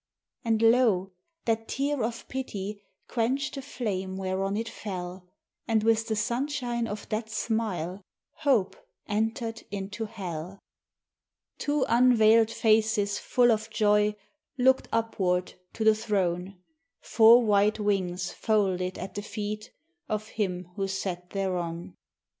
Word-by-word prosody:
And 225 -1 +1
lo! 225 -5 +4 0.3
that 225 -1 0
tear 280 0 -1
of 230 +1 -4
Pity 210 -6 -5 0.3
quenched 265 +5 0
the 275 - -5
flame 195 -8 -3
whereon 195 +1 -1
it 225 +1 -2
fell, 180 -4 -6 0.4
And, 220 -2 +2
with 225 0 +2
the 220 - 0
sunshine 240 0 -1
of 205 -1 -6
that 220 +1 -2
smile, 210 -5 -2 0.4
hope 260 -11 +2 0.3
entered 225 +2 -1
into 205 +2 -4
hell! 185 -4 -6 1.0
Two 290 -1 +1
unveiled 230 -2 +5
faces 215 -2 +2
full 245 -1 +3
of 220 0 0
joy 210 -1 +3 0.4
looked 260 +1 +3
upward 190 -6 0 0.2
to 225 - -3
the 220 0 +6
Throne, 195 -3 -1 0.4
Four 230 +2 +6
white 210 0 +3
wings 185 -3 0
folded 190 -4 0
at 185 - -6
the 205 - -4
feet 210 0 -5 0.4
of 215 0 -2
Him 180 -4 -3
who 195 -1 0
sat 185 -2 -4
thereon! 175 -3 -3
215 Hz, 125 wpm, -28 LUFS, 190-230 Hz, 1.0 s, the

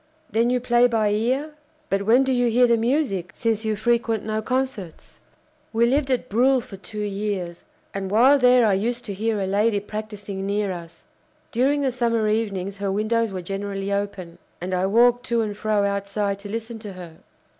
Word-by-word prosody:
Then 230 +2 +2
you 250 0 +2
play 240 0 +4
by 220 -3 +1
ear? 255 +8 0 0.4
But 195 +1 0
when 245 +4 +6
do 265 0 0
you 245 -1 +2
hear 245 +2 +4
the 235 -1 +4
music, 230 - 0
since 225 -1 0
you 220 -1 0
frequent 230 0 0
no 215 0 -1
concerts?" 250 -8 -4 0.5
"We 230 +1 +3
lived 270 +3 +1
at 255 -2 0
Bruhl 255 +5 +3
for 215 -4 -10
two 210 +3 -6
years, 195 -4 -3 0.3
and 195 -1 -4
while 255 +8 +5
there 250 -1 +5
I 210 - +3
used 235 +5 -1
to 205 - -4
hear 215 +2 -1
a 195 - -1
lady 205 +2 +2
practising 205 -2 -6
near 200 -1 0
us. 170 -2 -9 0.5
During 275 +4 +2
the 265 - +1
summer 230 -3 0
evenings 200 -3 -1
her 200 -1 -1
windows 215 +2 0
were 185 -2 -5
generally 195 +1 -3
open, 200 -4 -4 0.2
and 185 +2 -4
I 185 +1 +1
walked 240 +4 +3
to 235 -1 +1
and 210 -1 -4
fro 210 -1 0
outside 200 0 -2
to 200 0 -9
listen 225 +1 -5
to 210 -3 -8
her." 175 -3 -11
215 Hz, 190 wpm, -23 LUFS, 200-240 Hz, 0.5 s, when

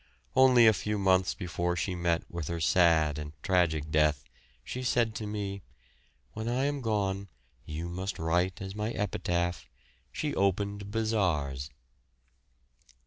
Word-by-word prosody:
Only 130 -3 +7
a 110 - +7
few 105 0 -2
months 95 -1 +2
before 85 -1 -2
she 90 +2 -1
met 85 -1 0
with 85 -4 -5
her 85 0 -3
sad 80 -3 +3
and 75 0 -7
tragic 80 -5 +1
death 75 -2 +2 0.4
she 125 - -5
said 120 -3 +1
to 110 -1 -5
me, 100 -2 -4 0.7
"When 110 +1 -4
I 125 +3 0
am 145 -1 -1
gone 100 -3 -1 0.4
you 80 +2 -4
must 95 +3 -4
write 90 +4 0
as 95 0 -6
my 105 +1 -2
epitaph, 85 -5 -2 0.4
'She - - -2
opened 100 +1 0
bazaars.'" 90 - 0
95 Hz, 140 wpm, -29 LUFS, 85-105 Hz, 0.7 s, Only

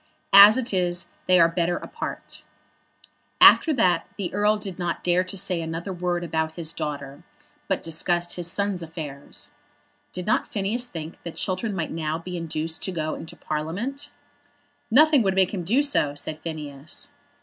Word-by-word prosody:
As 200 +3 +10
it 255 -4 -2
is 175 -1 +1 0.2
they 180 -1 +5
are 165 - +7
better 170 +1 0
apart." - - -7 1.0
After 325 - +8
that 180 -8 +2
the 195 -4 -4
Earl 210 +2 +2
did 195 -4 -6
not 175 -1 -3
dare 180 +1 +3
to 185 +2 -6
say 180 -2 -1
another 165 +4 -4
word 175 -1 -2
about 160 -1 -2
his 165 -1 -4
daughter; 140 -2 -5 0.5
but - - -1
discussed 175 +2 0
his 175 -1 -3
son's 200 -2 -1
affairs. 155 -4 -7 0.6
Did 180 -1 -6
not 215 - +1
Phineas 220 +5 -1
think 165 -6 -8
that 170 - -8
Chiltern 195 +3 -2
might 170 -4 -3
now 160 -1 -2
be 180 +2 -7
induced 160 -1 -3
to 190 - -2
go 155 -3 -2
into 160 - -8
Parliament? 180 - -4 0.8
"Nothing 295 +3 +6
would 190 -3 +1
make 190 0 +2
him 185 -3 -3
do 240 - +2
so," 150 - +1
said 155 +2 -4
Phineas. 150 -3 -6
175 Hz, 165 wpm, -24 LUFS, 160-195 Hz, 1.0 s, As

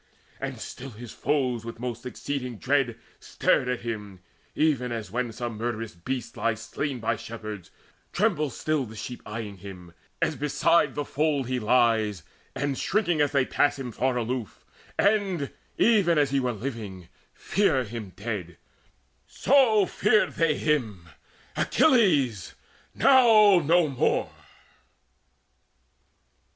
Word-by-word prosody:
And - - -4
still 135 +2 -8
his 120 0 -10
foes 125 -6 -1
with 115 0 -7
most 125 0 -5
exceeding 125 -2 -4
dread 130 -2 0 0.2
Stared 125 - +1
at 125 -1 -2
him, 105 -5 -6 0.3
even 135 -6 +1
as, 110 -5 -5
when 120 +1 -2
some 115 -1 -5
murderous 115 -1 -3
beast 125 +9 -5
Lies 115 -2 -1
slain 140 0 -3
by 110 0 0
shepherds, 110 -4 -8 0.4
tremble 175 -7 +1
still 150 +2 -1
the 110 - -11
sheep 115 +3 -7
Eyeing 105 -2 -6
him, 90 -3 -11 0.3
as - - 0
beside 155 +3 +2
the 145 - -2
fold 145 -3 0
he 130 0 -1
lies, 110 -5 +2 0.3
And 140 -2 -2
shrinking, 175 -7 +1
as 145 - +2
they 140 -3 +2
pass 145 +2 +1
him, 130 -3 -5
far 130 +2 0
aloof 120 -1 -4 0.3
And, 195 -8 +1 0.3
even 200 -8 +4
as 145 -2 +2
he 140 - +2
were 125 -2 0
living, 110 -7 -6 0.3
fear 165 -9 +1
him 110 -3 -7
dead; 100 -6 -5 0.7
So 240 -7 +4
feared 210 +3 +2
they 165 -3 +1
him, 110 - -1 0.5
Achilles 155 - +2 0.4
now 225 -8 +6
no 165 +1 +3
more. 135 -3 0
125 Hz, 130 wpm, -26 LUFS, 110-150 Hz, 0.7 s, now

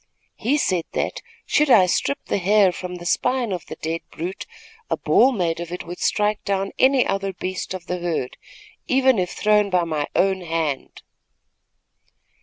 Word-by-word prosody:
He 275 +6 +1
said 180 - 0
that, - - -2 0.2
should 300 0 +2
I 205 -7 +7
strip 280 +10 -1
the - - -1
hair 195 +1 +4
from 180 0 -6
the 175 -1 -9
spine 250 +4 0
of 180 -2 -4
the - - -7
dead 165 +1 -3
brute, 175 +4 -6 0.4
a - - 0
ball 260 - +4
made 170 -8 -1
of 170 0 -6
it 180 - -5
would 175 +1 -8
strike 210 0 0
down 195 -1 -1
any 265 -1 +5
other 195 0 -2
beast 185 +1 -4
of 180 -2 -8
the 180 0 -3
herd, 165 -7 -2 0.5
even 260 -3 +3
if 180 -1 0
thrown 210 -1 +2
by 180 -2 +2
my 155 -3 -2
own 190 -1 +2
hand." 160 -5 -3
185 Hz, 175 wpm, -22 LUFS, 175-210 Hz, 0.5 s, I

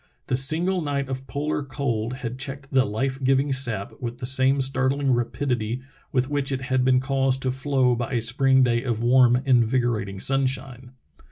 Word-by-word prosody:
The 125 - -1
single 165 +8 +2
night 140 -3 -2
of 130 0 -5
polar 150 +1 -2
cold 130 -5 -3
had 120 +2 -5
checked 140 0 -6
the 135 -1 +3
life 130 +6 -3
giving 135 +1 +2
sap 120 -7 +1
with 120 -1 -5
the 125 - -6
same 130 +2 +3
startling 135 +1 0
rapidit}' 120 -1 -2 0.3
with 130 -1 0
which 145 -1 -1
it 130 -1 -2
had 130 -1 0
been 130 0 +3
caused 135 0 0
to 130 - 0
flow 130 -1 +1
by 120 +2 -4
a 120 - +1
spring 130 +3 +3
day 120 -1 +1
of 115 -3 -2
warm, 125 +1 +4
invigorating 120 -5 +1
sunshine. 130 0 -2
130 Hz, 175 wpm, -24 LUFS, 120-135 Hz, 0.3 s, warm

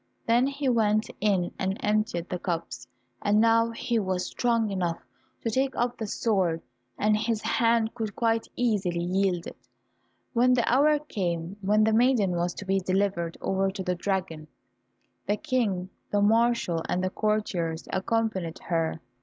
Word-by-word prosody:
Then 240 +3 +3
he 280 0 -3
went 215 -3 +2
in 195 -4 +1
and 190 +1 -1
emptied 210 -5 0
the 180 - -4
cups, 165 -9 -4 0.3
and 210 +1 +3
now 230 +1 +4
he 230 0 -1
was 185 -3 -1
strong 230 -3 0
enough 175 -3 -1 0.5
to 230 - 0
take 265 +3 0
up 240 0 0
the 220 -3 -5
sword, 190 -7 0 0.3
and 210 0 +3
his 220 0 -1
hand 230 -1 +2
could 220 -4 -4
quite 225 -1 +1
easily 195 -8 0
wield 185 -1 0
it. - - -11 0.7
When 250 +1 +4
the 240 - +1
hour 295 +5 +4
came 180 - -3
when 210 +2 +3
the 220 0 +3
maiden 230 -4 +3
was 175 0 -1
to 200 - -7
be 195 +1 +2
delivered 185 -2 -1
over 195 0 +1
to 190 0 -5
the 180 -1 0
dragon, 175 -4 -3 0.8
the 205 - +1
King, 210 -11 -1 0.2
the 205 - +1
marshal, 225 -6 +2
and 185 - 0
courtiers 185 -7 -1
accompanied 190 -4 -1
her. 165 -1 -1
205 Hz, 155 wpm, -27 LUFS, 180-230 Hz, 0.8 s, now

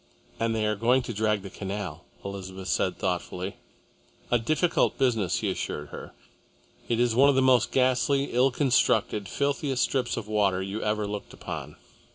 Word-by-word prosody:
"And 115 0 0
they 110 -1 0
are 105 0 +1
going 125 +5 +3
to 120 - -5
drag 105 -1 0
the 95 - -8
canal," 95 -5 -5 0.2
Elizabeth 95 -1 -6
said - - 0
thoughtfully. 90 +2 -3 0.7
"A 120 - +4
difficult 155 +8 +1
business," 115 -9 +1
he - - 0
assured 75 -1 -4
her. - - -9 0.8
"It 115 -1 +1
is 120 -1 +3
one 135 +4 +6
of 140 - +3
the 135 - +4
most 125 -3 +4
ghastly, 130 +2 +2
ill 125 +3 +4
constructed, 120 -6 +1
filthiest 140 -2 0
strips 125 -3 0
of 110 -2 -4
water 100 -3 +2
you 95 +3 -4
ever 105 0 0
looked 100 0 -6
upon. - - -7
110 Hz, 170 wpm, -27 LUFS, 100-130 Hz, 0.8 s, one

